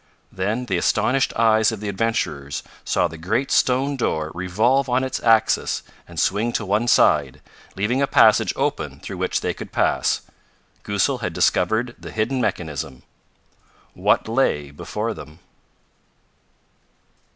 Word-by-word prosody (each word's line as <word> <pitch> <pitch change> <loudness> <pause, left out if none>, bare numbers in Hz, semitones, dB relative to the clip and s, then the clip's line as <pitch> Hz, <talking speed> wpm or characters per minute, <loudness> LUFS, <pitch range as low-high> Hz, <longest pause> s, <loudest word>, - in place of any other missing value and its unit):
Then 105 +7 -2
the 95 -7 -1
astonished 135 +8 +1
eyes 110 -1 +4
of 110 - -5
the 105 - -5
adventurers 95 - -2 0.2
saw 90 - +1
the 80 -1 -11
great 110 +11 -1
stone 135 +3 +2
door 80 -10 -1
revolve 110 - +1
on 125 +1 +2
its 130 - -3
axis 115 -1 +2 0.2
and - - -7
swing 110 +5 +1
to 105 - -2
one 105 +5 0
side, 70 - +3 0.4
leaving 110 +7 0
a 140 - +2
passage - - +5
open - - -2
through - - -7
which - - -1
they - - -1
could - - -9
pass. - - +1 0.6
Goosal 105 +6 0
had 90 -8 -3
discovered 110 +9 +1
the - - -9
hidden 120 +4 -1
mechanism. 75 - -3 0.9
What - - +1
lay 95 - 0
before 70 - -4
them? 75 +1 -11
110 Hz, 140 wpm, -22 LUFS, 90-125 Hz, 0.9 s, passage